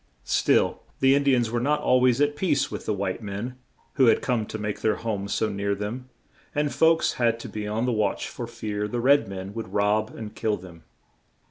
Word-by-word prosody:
Still, - - +2 0.2
the 135 0 +5
In 140 - +3
di 140 -2 +4
ans 120 -2 0
were 120 - 0
not 150 +4 +1
al 130 -3 +3
ways 125 0 +4
at 145 0 +2
peace 150 -5 +1
with - - -6
the 110 - +1
white 95 +2 -3
men, 110 +5 -5 0.4
who 130 -3 +6
had - - +4
come 115 -5 0
to - - -5
make 105 -1 -4
their 110 - +2
homes 100 -3 -3
so 110 - +1
near 100 0 -1
them, 115 +6 -5 0.5
and 145 0 0
folks 165 0 +3
had 115 -1 +2
to - - -7
be 105 -1 -5
on 110 +3 -1
the 125 - +1
watch 105 -3 0
for 120 - -6
fear 105 -3 -4
the 120 +3 -3
red 140 +2 +4
men 95 0 -6
would 115 -4 -6
rob 105 +1 +2
and 105 -2 -7
kill 110 -1 -1
them. 85 -3 -13
110 Hz, 225 wpm, -25 LUFS, 105-130 Hz, 0.5 s, who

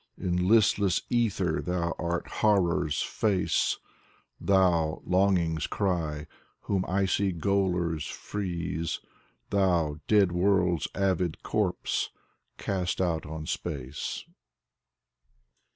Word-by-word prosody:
In 90 0 0
listless 100 -3 +4
ether 100 -8 +1
thou 85 -1 -1
art 85 0 -1
horror's 90 -7 +2
face, 100 -4 +1 0.6
Thou, 90 -5 +2
longing's 90 -4 +2
cry, 80 -7 -1 0.4
whom 95 -2 0
icy 95 +1 +1
gaolers 90 -3 0
freeze. 85 -4 -3 0.5
Thou, 90 -7 +2
dead 100 -4 +4
world's 90 -2 +2
avid 95 -4 0
corpse, - - 0 0.5
cast 90 -2 -2
out 85 -5 0
on 80 0 -6
space. 70 -5 -4
90 Hz, 90 wpm, -28 LUFS, 85-100 Hz, 0.6 s, listless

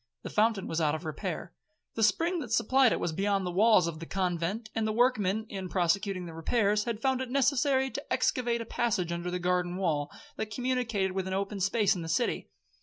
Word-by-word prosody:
The - - -6
fountain 215 -2 +2
was 165 +1 -2
out 150 -1 +2
of 160 +2 -7
repair. 170 +2 -4 0.4
The 225 - -3
spring 335 - +2
that 245 -7 -6
supplied 245 +2 +4
it - - 0
was 170 - -1
beyond 195 +2 0
the 180 - -2
walls 205 -1 +5
of 165 -2 -4
the 165 - -8
convent, 190 +4 -2
and 220 -1 0
the - - 0
workmen, 220 -3 +2
in 190 -3 -6
prosecuting 185 +1 0
the 165 - -8
repairs, 210 +5 +1
had 230 -2 -4
found 265 -1 +1
it 260 - -4
necessary 265 0 +2
to 280 - -7
excavate 235 -2 +1
a - - -5
passage 210 -7 -1
under 170 +1 -3
the 180 - -2
garden 180 0 0
wall, 155 -6 0 0.3
that 220 - -3
communicated 230 -5 -1
with 190 0 -3
an 190 - -2
open 200 +1 -2
space 200 +1 +2
in 180 - -4
the 165 - -6
city. 165 - 0
200 Hz, 215 wpm, -29 LUFS, 180-235 Hz, 0.4 s, walls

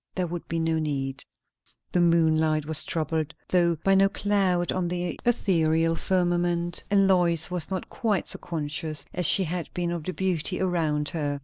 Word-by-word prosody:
There 185 - 0
would 175 0 -6
be 165 - -3
no 160 0 0
need. 140 -3 -3 0.7
The 180 - +2
moonlight 160 -2 +2
was 155 0 +2
troubled, 160 0 -3
though 175 -2 +2
by 195 - +3
no 195 0 +4
cloud 195 -4 +1
on 185 -2 -1
the 175 0 -3
ethereal 165 -8 +2
firmament; 175 -1 0
and 200 -1 +4
Lois 175 -3 +3
was 175 -3 -3
not 190 -1 -4
quite 210 -6 -1
so - - 0
conscious 155 -1 -3
as 180 -2 +3
she 195 - +5
had 170 -2 -4
been 175 -1 -1
of 170 -2 -4
the 185 - -3
beauty 185 -1 -1
around 160 -5 0
her. 145 -3 -3
170 Hz, 175 wpm, -26 LUFS, 160-180 Hz, 0.7 s, she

